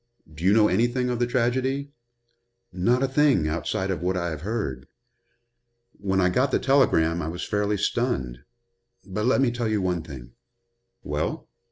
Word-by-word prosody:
Do 80 +2 -10
you 95 - +4
know 105 0 +5
anything 120 +5 +1
of 120 - -2
the 120 - +1
tragedy?" 130 +3 0 0.8
"Not 120 +9 +1
a - - +2
thing, 135 - +3
outside 85 +4 -2
of 85 -4 -3
what 90 +1 0
I 85 -1 -2
have 80 -2 -6
heard. 85 - -4 1.1
When 95 -1 0
I 90 - +4
got 125 +9 +2
the - - +2
telegram 85 - +2
I 80 - -3
was 85 +2 -4
fairly 105 0 0
stunned. 95 - -1 0.7
But 105 +2 -3
let 130 - +3
me 130 -3 +3
tell 120 -1 -2
you 110 -1 0
one 90 -3 -1
thing." 65 -7 -10 0.7
"Well?" 75 +1 -3
100 Hz, 170 wpm, -25 LUFS, 85-125 Hz, 1.1 s, know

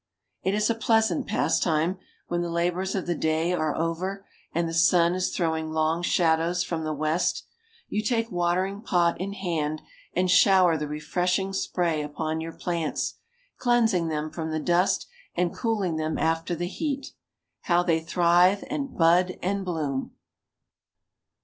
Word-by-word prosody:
It 190 +2 0
is 210 0 +2
a 230 - +2
pleasant 225 +3 +1
pastime, 175 -3 +1 0.3
when 175 0 -1
the 175 - -2
labors 175 +3 -1
of 190 - -2
the 175 - 0
day 160 +2 0
are 155 -3 0
over, 185 +5 -2 0.3
and 170 +1 0
the 165 - -4
sun 170 +1 +4
is 185 0 0
throwing 160 -2 -1
long 160 +1 0
shadows 170 0 +2
from 165 -2 -3
the 155 - -2
west, 155 +3 0 0.4
you 210 - -1
take 230 +1 -1
watering 180 +3 0
pot 175 -6 +1
in 200 +1 -3
hand, 160 -6 -2 0.3
and 180 0 +2
shower 185 -3 +5
the 150 -1 -3
refreshing 180 +6 -1
spray 170 -4 0
upon 155 +2 -3
your 165 0 -6
plants, 170 -2 -3 0.4
cleansing 225 -9 +2
them 155 -1 -3
from 160 0 -4
the 155 0 -1
dust, 175 +4 +2 0.3
and 175 0 0
cooling 205 -8 -1
them 155 0 -2
after 165 +2 0
the 175 +2 -3
heat. 280 - -4 0.5
How 175 0 +3
they 165 -2 +2
thrive, 175 +3 +3
and 280 -3 -4
bud 175 +2 +4
and 195 +2 -1
bloom! 150 -7 -3
175 Hz, 155 wpm, -26 LUFS, 160-190 Hz, 0.5 s, shower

